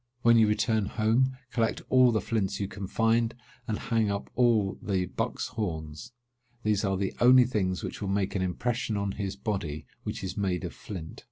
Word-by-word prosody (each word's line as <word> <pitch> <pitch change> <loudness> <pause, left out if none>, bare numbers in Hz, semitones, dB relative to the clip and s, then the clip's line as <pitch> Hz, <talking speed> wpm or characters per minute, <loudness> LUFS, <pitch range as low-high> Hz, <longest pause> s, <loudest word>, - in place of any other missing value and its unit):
When 115 0 +6
you 110 -1 +6
return 105 0 +1
home, 120 +5 +1
collect 115 -1 0
all 130 -1 +6
the 110 - +1
flints 100 -3 -1
you 100 - -1
can 95 0 -6
find, 115 +2 +2 0.3
and 110 -2 -1
hang 115 -3 0
up 100 0 -3
all 115 -6 +2
the 95 -3 0
bucks' 115 +6 -3
horns. 85 -4 -5 0.5
These 105 -1 +1
are 95 -1 +1
the 95 0 -1
only 125 +1 +8
things 95 -7 -1
which - - -5
will 100 - -2
make 100 -1 0
an 95 - 0
impression 110 +4 -1
on 100 -1 -1
his 100 -1 -4
body, 95 -8 -3 0.2
which - - -5
is 95 0 -4
made 95 -3 -1
of - - -5
flint." 85 -6 -8
105 Hz, 190 wpm, -28 LUFS, 95-115 Hz, 0.5 s, only